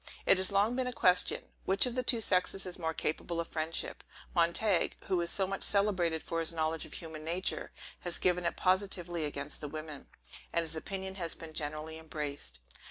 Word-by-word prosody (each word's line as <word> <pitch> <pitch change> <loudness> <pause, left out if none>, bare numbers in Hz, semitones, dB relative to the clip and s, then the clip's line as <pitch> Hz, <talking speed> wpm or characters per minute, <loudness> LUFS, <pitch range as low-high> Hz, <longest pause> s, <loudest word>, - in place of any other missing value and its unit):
It - - +7
has 190 +1 +4
long 205 +4 +3
been 255 0 0
a - - -1
question, 180 -5 +4 0.2
Which 195 +5 +5
of 250 - -2
the 255 - 0
two 240 -2 +3
sexes 195 -1 +1
is 180 0 -6
most 160 -1 -2
capable 165 +2 -2
of 165 - -3
friendship? 160 0 -2 0.3
Montague, 170 +3 +2
who 185 -2 0
is 170 - +2
so 195 - +4
much 195 +1 -4
celebrated 185 -6 +3
for 165 - -2
his 165 0 +4
knowledge 160 -1 -1
of - - -13
human 160 -2 -7
nature, 175 +4 -1 0.3
has 175 -1 -3
given 180 -1 +1
it - - -3
positively 180 -3 +1
against 145 -1 -3
the 150 - -3
women; 155 -1 -7 0.4
and 170 - +2
his 160 -1 -3
opinion 190 +3 -4
has 165 -1 0
been 160 -1 -10
generally 155 +1 -4
embraced. 145 - -5
170 Hz, 195 wpm, -32 LUFS, 160-190 Hz, 0.4 s, It